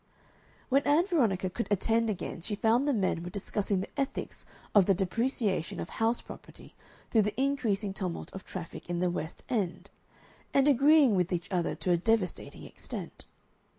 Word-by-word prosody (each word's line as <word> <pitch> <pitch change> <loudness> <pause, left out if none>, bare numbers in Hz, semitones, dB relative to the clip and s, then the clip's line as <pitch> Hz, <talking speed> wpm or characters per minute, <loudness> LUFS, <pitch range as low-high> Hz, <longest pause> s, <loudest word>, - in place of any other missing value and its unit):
When 275 +1 +4
Ann 300 +5 +3
Veronica 230 - +1
could 230 +6 -3
attend 225 +3 +2
again 185 -4 -4
she 205 +4 -3
found 235 +6 +2
the - - +3
men 195 -8 0
were 175 - -5
discussing 200 0 -2
the 235 - -7
ethics 275 0 -3 0.3
of 200 -4 +6
the 195 - +4
depreciation 200 - -1
of - - -5
house 225 +1 +1
property - - -12 0.4
through 225 - +5
the 210 +4 -2
increasing 225 -8 0
tumult 185 -3 -4
of 190 - -7
traffic 175 -1 -8
in 175 - -1
the 180 0 +1
West 160 -2 -5
End, 200 -8 -2 0.6
and 275 0 +5
agreeing 285 -1 +6
with 180 -2 +1
each 175 -2 -3
other 175 -2 0
to 180 - -1
a 175 - +4
devastating 200 0 -1
extent. - - -8
205 Hz, 170 wpm, -30 LUFS, 185-245 Hz, 0.6 s, of